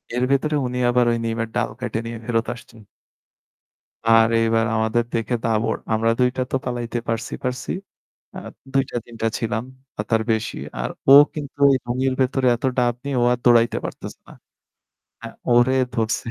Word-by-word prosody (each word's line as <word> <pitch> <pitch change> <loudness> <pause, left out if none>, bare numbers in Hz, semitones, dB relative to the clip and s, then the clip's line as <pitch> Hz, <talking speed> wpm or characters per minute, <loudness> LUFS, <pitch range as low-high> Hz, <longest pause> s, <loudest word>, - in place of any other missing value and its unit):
এর 125 - 0
ভেতরে 150 +3 +1
উনি 125 0 -3
আবার 120 0 +3
ওই 115 - 0
নিমের 115 0 -2
ডাল - - 0
কাইটে 120 -3 -3
নিয়ে 115 0 -5
ফেরত 115 -1 0
আসছেন। 115 -1 -15 1.2
আর 115 0 +6
এইবার 115 0 +2
আমাদের 110 +2 +1
দেখে 115 +1 -1
দাবর। 115 0 +1 0.2
আমরা 110 +1 +2
২ 125 0 +4
টা - - 0
তো - - 0
পালাইতে 120 -1 -3
পারছি 115 -1 -3
পারছি। 125 -1 -3 0.7
আ - - -5 0.3
২ 135 0 +3
টা - - -5
৩ 120 - -12
টা 115 - +3
ছিলাম 110 0 -2 0.3
বা 105 - -1
তার 110 -1 +2
বেশি। 110 0 -2 0.2
আর - - -2 0.2
ও - - +9 0.2
কিন্তু 145 -2 -7
এই - - +4
লুঙ্গির 130 +2 0
ভেতরে 130 0 +1
এত 120 - -17
ডাব 120 -1 +2
নিয়ে 140 -2 -2
ও - - +4
আর 125 - -1
দৌড়াইতে 120 -1 +4
পারতেছে - - -7
না। - - -12 0.9
হ্যাঁ, - - -8 0.2
ওরে 120 +2 +4 0.2
ধরছে। 110 -1 -1
120 Hz, 180 wpm, -22 LUFS, 115-125 Hz, 1.2 s, ও